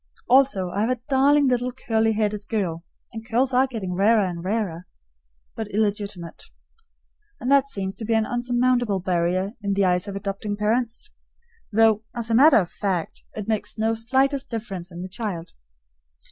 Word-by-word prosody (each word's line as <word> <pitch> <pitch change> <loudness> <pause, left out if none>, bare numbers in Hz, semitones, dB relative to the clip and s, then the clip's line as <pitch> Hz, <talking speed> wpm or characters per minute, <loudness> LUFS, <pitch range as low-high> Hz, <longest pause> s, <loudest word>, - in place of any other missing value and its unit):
Also 245 -8 +3
I 200 - -1
have 225 - +1
a 255 -2 0
darling 280 +1 +4
little 250 0 +1
curly 225 -3 0
headed 210 -1 -1
girl 180 -8 -2 0.3
(and 225 -1 -6
curls 250 +4 0
are 260 +2 +4
getting 215 -8 -4
rarer 210 +4 +4
and 175 -2 -5
rarer), 185 -4 -2 0.7
but 220 - -4
illegitimate. 205 -4 -2 0.9
And 250 - -2
that 280 -1 +5
seems 195 -5 -4
to 220 - -5
be 225 +1 +1
an 220 -1 +2
unsurmountable 245 -3 +1
barrier 185 +1 0
in 200 -1 -1
the 200 -1 +3
eyes 180 +2 +1
of 200 - -5
adopting 200 +1 -4
parents, 230 - -1 0.6
though, 220 0 +4
as 230 -1 -3
a - - +2
matter 275 +6 +7
of 180 -5 0
fact, 185 -5 -3
it 210 -1 -5
makes 215 -1 -1
no 220 +1 +1
slightest 265 +4 +1
difference 195 -6 -5
in 175 +1 -7
the - - -5
child. 185 -4 -5
215 Hz, 170 wpm, -24 LUFS, 195-245 Hz, 0.9 s, matter